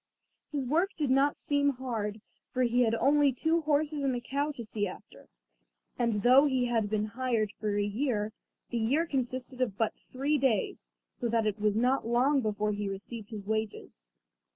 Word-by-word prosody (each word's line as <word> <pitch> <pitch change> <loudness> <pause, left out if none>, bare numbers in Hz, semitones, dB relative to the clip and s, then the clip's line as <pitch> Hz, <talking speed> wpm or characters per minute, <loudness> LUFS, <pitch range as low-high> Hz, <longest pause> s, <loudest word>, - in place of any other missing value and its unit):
His 285 -3 -2
work 330 +9 +2
did 290 -5 0
not 275 +2 +3
seem 285 -2 +1
hard, 220 -5 -4 0.3
for 255 - +1
he 245 +1 +2
had 230 -2 +3
only 285 +3 +4
two 320 +6 +1
horses 300 -1 0
and 270 -2 +1
a - - -1
cow 280 +4 -2
to 240 - -7
see 210 -1 -2
after, 185 - -12 0.7
and 235 -3 +1
though 260 +4 +7
he 260 -3 +1
had 225 -4 0
been 215 0 0
hired 230 -2 -1
for 210 -1 -1
a 205 - +2
year, 215 0 -1 0.4
the 240 - 0
year 275 +9 +2
consisted 255 -3 -3
of 220 -6 0
but 225 -2 +1 0.2
three 285 +3 +1
days, 220 - 0 0.2
so 240 - -3
that 225 -1 +1
it 210 0 -1
was 210 0 +1
not 250 +2 +2
long 260 +4 +3
before 210 -1 -1
he 205 -1 -2
received 205 +2 -7
his 210 -4 -7
wages. 210 - -4
240 Hz, 185 wpm, -30 LUFS, 215-275 Hz, 0.7 s, though